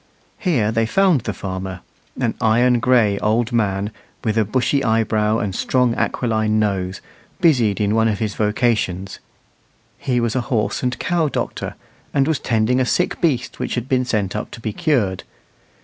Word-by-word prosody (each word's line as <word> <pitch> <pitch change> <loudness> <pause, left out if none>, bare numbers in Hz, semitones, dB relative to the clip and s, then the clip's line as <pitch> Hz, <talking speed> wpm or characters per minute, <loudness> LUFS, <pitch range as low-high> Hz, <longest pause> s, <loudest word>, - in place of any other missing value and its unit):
Here 120 - +1
they 115 0 +1
found 185 -3 +3
the 105 - -3
farmer, 95 -2 -5 0.4
an - - 0
iron 120 +2 +3
gray 115 -5 +3
old 115 +3 +1
man, 105 -3 0 0.3
with 110 -3 0
a 110 - +3
bushy 130 +6 0
eyebrow 110 -1 +1
and 105 -4 -2
strong 125 +3 +1
aquiline 110 -3 0
nose, 95 -3 -1 0.4
busied 125 - +3
in 105 0 +1
one 110 0 +3
of 105 -2 0
his 105 0 -2
vocations. 105 -4 0 0.8
He 125 -2 0
was 115 0 -1
a 130 - +1
horse 110 -4 0
and 125 0 -1
cow 170 -3 0
doctor, - - -4 0.4
and 135 0 +3
was 160 -3 +1
tending 115 +2 +1
a - - +3
sick 180 +8 0
beast 135 -8 0
which - - -2
had 120 0 -3
been 130 -2 +2
sent 105 -6 -1
up 105 - -3
to - - -10
be 110 -2 -4
cured. 125 - 0
115 Hz, 170 wpm, -20 LUFS, 105-125 Hz, 0.8 s, found